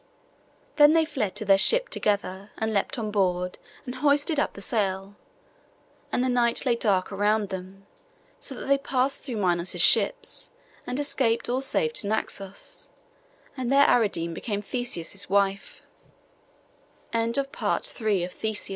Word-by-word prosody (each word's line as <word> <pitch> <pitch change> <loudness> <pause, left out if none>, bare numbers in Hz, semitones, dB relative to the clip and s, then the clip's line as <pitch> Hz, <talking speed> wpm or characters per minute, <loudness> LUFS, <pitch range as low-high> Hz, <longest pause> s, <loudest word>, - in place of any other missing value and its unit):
Then 295 0 +7
they 325 -1 +4
fled 220 - -3
to 215 +1 -3
their 195 -1 +5
ship - - +5
together, 200 -1 -2
and 220 0 -1
leapt 200 - -1
on 215 -3 -3
board, 180 -3 0 0.3
and 250 - -5
hoisted 285 +3 +2
up - - 0
the - - -10
sail; 195 -2 -1 1.0
and 245 - +1
the - - +1
night 245 0 +2
lay 245 -2 +3
dark 200 -6 +1
around 205 +1 +1
them, 190 +1 -8 0.5
so 270 - -6
that - - -7
they 275 0 +3
passed 270 0 -1
through 250 -5 -5
Minos' 175 -3 0
ships, - - +2 0.4
and 250 +3 -2
escaped 255 -6 0
all 255 +2 0
safe 465 - +1
to 205 - +2
Naxos; 200 -2 -4 0.7
and 255 -2 -3
there 280 +1 +6
Ariadne 170 -8 +2
became 205 +3 -4
Theseus' 205 -6 -3
wif 195 0 0
220 Hz, 135 wpm, -26 LUFS, 195-265 Hz, 1.0 s, Then